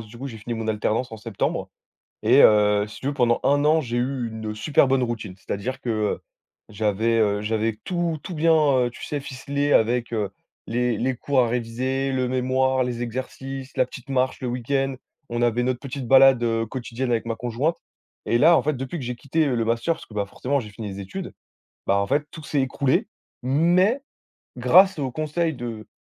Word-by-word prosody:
d 110 - -9
du 115 - -13
coup, 135 +3 -6
j'ai 115 -4 -9
fini 115 +3 -5
mon 110 -1 -4
alternance 110 +3 0
en 110 - -7
septembre 110 -2 -3 0.5
et - - +6
heu, 105 -1 +5
si 105 - -11
tu 130 - -6
veux 145 - -1
pendant 120 -3 +2
un 145 +1 +3
an 160 +1 +4
j'ai 120 -3 -3
eu 125 -1 -1
une 110 -1 -5
super 135 +5 +3
bonne 135 -1 +2
routine. 115 -6 -3
C'est-à-dire 100 +7 -4
que, - - -6
heu, 110 -2 0 0.5
j'avais, 110 +2 0
heu, 105 -2 +2
j'avais 110 0 -1
tout 175 -3 -1
tout 180 - -6
bien, 165 +2 +3 0.3
heu, 125 -1 +1
tu - - -9
sais 145 -1 -3
ficelé 140 +2 -2
avec, 120 +1 +2
heu, 105 -4 -1 0.4
les 120 -1 0
les 130 +1 0
cours 135 +2 +1
à 120 - +2
réviser, 125 +3 -1
le 130 -1 0
mémoire, 130 +1 +1
les 120 -1 -3
exercices, 130 +2 -6
la 130 - +3
petite 130 0 -11
marche 130 -1 0
le 130 - -3
week-end, 135 +2 -1 0.3
on 120 0 -2
avait 120 0 +2
notre 125 0 0
petite 135 -2 -6
balade, 135 -1 +6
heu, 115 -1 0
quotidienne 125 +2 -4
avec 115 -2 +1
ma 115 -1 -2
conjointe 125 +8 -1 0.5
et - - +2
là, 165 +5 +6
en - - 0
fait, 150 - 0
depuis 135 +6 -5
que 135 - -5
j'ai 125 +1 -3
quitté, 150 +6 0
heu, 135 - 0
le 115 -1 0
master 115 +8 +1
parce - - -13
que - - -18
bah, 100 -1 -1
forcément, 140 +7 -1
j'ai 105 -4 -9
fini 105 0 -7
les 100 0 -6
études, 95 0 -6 0.5
bah 100 - +2
en 100 0 0
fait, 145 +2 +1
tout 160 - -9
s'est 145 -1 0
écroulé. 135 0 +1 0.4
Mais 175 - +3 0.6
grâce 190 -1 +5
aux 135 -2 -1
conseils 155 +4 -1
de 115 -4 -6
125 Hz, 210 wpm, -24 LUFS, 115-135 Hz, 0.6 s, et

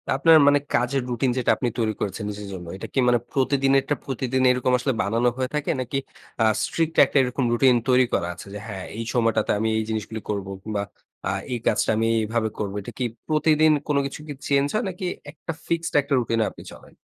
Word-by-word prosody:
আপনার 160 +4 +6
মানে 145 0 +5
কাজের 125 +3 +1
রুটিন 125 +1 0
যেটা 125 - +2
আপনি 125 - 0
তৈরি 110 -2 +1
করেছেন 100 +2 -3
নিজের 105 0 -6
জন্য। 90 -2 -7
এটা - - -7
কি 135 - +1
মানে 120 -1 +4
প্রতিদিনেরটা 135 +1 +2
প্রতিদিন 130 0 -1
এরকম 125 0 +1
আসলে 130 +1 0
বানানো 115 +4 +2
হয়ে 130 0 -1
থাকে 150 +1 0
নাকি, 130 +2 -3 0.4
এ্যাঁ 110 -1 +4
strict 165 -1 -1
একটা - - -1
এরকম 125 +1 -1
রুটিন 125 +1 +5
তৈরি 125 0 +5
করা 85 - +1
আছে, 85 - -11
যে 105 - -5
হ্যাঁ 95 -3 -6
এই 115 - -3
সময়টাতে 115 -3 +1
আমি 110 - 0
এই 110 - 0
জিনিসগুলো 110 0 -4
করব 100 -2 -2
কিংবা 105 0 -3 0.4
এ্যাঁ 95 0 -1
এই 120 - -2
কাজটা 110 - +2
আমি 115 +1 +1
এইভাবে 110 0 -1
করবো। 100 -1 -3
এটা - - -8
কি - - 0 0.2
প্রতিদিন 155 0 +4 0.2
কোন 145 -2 +1
কিছু 140 - -6 0.3
চেঞ্জ 140 0 +3
হয় 215 - +1
নাকি 185 0 -6 0.3
একটা 160 +1 -7 0.2
ফিক্সড 170 0 -1
একটা 140 0 -3
রুটিন-এ 115 -2 0
আপনি - - -13
চলেন? - - -16
125 Hz, 205 wpm, -24 LUFS, 110-140 Hz, 0.4 s, আপনার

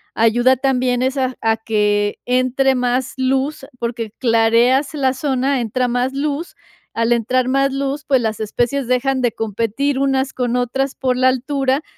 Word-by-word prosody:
ayuda 240 +3 +3
también 255 -1 0
es 260 +1 0
a 260 -1 -1
a 225 0 +1
que 210 -2 0
entre 255 +2 +2
más 250 +1 -1
luz, 270 +2 -1
porque 235 -2 -4
clareas 240 +4 +3
la 265 -3 +1
zona, 265 -1 0
entra 250 +3 -1
más 245 +2 0
luz, 290 +4 -3 0.4
al 230 +1 0
entrar 250 +2 0
más 275 +1 +2
luz, 275 +2 -3
pues, 265 -2 +3
las 220 -2 -2
especies 240 +4 -1
dejan 260 +1 +1
de 245 -2 +1
competir 230 +6 -2
unas 270 -1 0
con 245 -1 -1
otras 260 +2 -1
por 255 -1 0
la 255 - +3
altura 270 +2 0
255 Hz, 160 wpm, -19 LUFS, 235-270 Hz, 0.4 s, ayuda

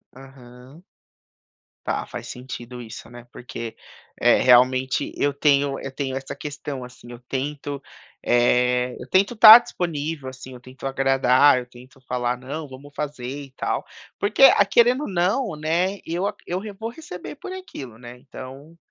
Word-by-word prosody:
Aham. 130 +3 -15 1.0
Tá, - - -2
faz - - -8
sentido 125 -1 -8
isso, 115 0 -10
né. 120 0 -12
Porque, 115 -2 -8 0.4
eh, - - +5
realmente 130 +1 +3
eu 145 0 0
tenho 140 -1 +2
eu 135 - -6
tenho 135 -1 -4
essa 135 0 -7
questão, 140 -1 -6
assim, 125 -1 -13
eu 120 - -10
tento, 140 +1 -4 0.4
eh, 125 +1 +2
eu 125 - -9
tento 195 +5 +3
estar 220 +1 +11
disponível, 160 - -4
assim, 130 0 -11
eu 125 - -11
tento 130 +2 -12
agradar, 135 0 +4
eu 125 - -7
tento 125 +2 -17
falar 125 -1 -2
não, 145 +5 -6
vamos 140 +2 -13
fazer 145 -5 -5
e 135 +1 -7
tal. - - -3 0.3
Porque 210 +6 +2
a 210 -6 +8
querendo 245 +7 +3
não, 190 +3 0
né, 170 +6 -1
eu 175 +4 -2
aca - - -7
eu 180 +1 -2 0.2
vou 225 +2 -4
receber 240 - -9
por 370 - -9
aquilo, 140 - -9
né, 120 +1 -11
então, 135 +4 -11
135 Hz, 155 wpm, -23 LUFS, 125-160 Hz, 1.0 s, estar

